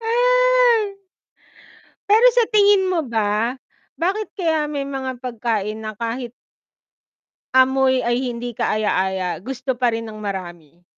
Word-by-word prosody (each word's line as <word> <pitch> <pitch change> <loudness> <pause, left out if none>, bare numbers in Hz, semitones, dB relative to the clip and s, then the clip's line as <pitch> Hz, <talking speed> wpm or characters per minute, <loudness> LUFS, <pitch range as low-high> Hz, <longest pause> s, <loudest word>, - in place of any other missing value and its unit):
Ay. - - +3 1.2
Pero 440 +4 +5
sa 485 - +5
tingin 405 -2 +5
mo 350 - +1
ba, 225 +2 0 0.4
bakit 395 +5 -1
kaya 320 -5 0
may 285 -2 -3
mga 265 -2 -5
pagkain 220 -3 -2
na 215 -1 -6
kahit 235 +2 -5 1.2
amoy 260 0 +4
ay 240 0 0 0.2
hindi 235 -1 -6
kaaya-aya, 190 -4 0
gusto 260 +3 -4
pa 245 -2 +1
rin 225 0 -4
ng 215 - -10
marami? 175 -5 -7
255 Hz, 120 wpm, -21 LUFS, 215-365 Hz, 1.2 s, Pero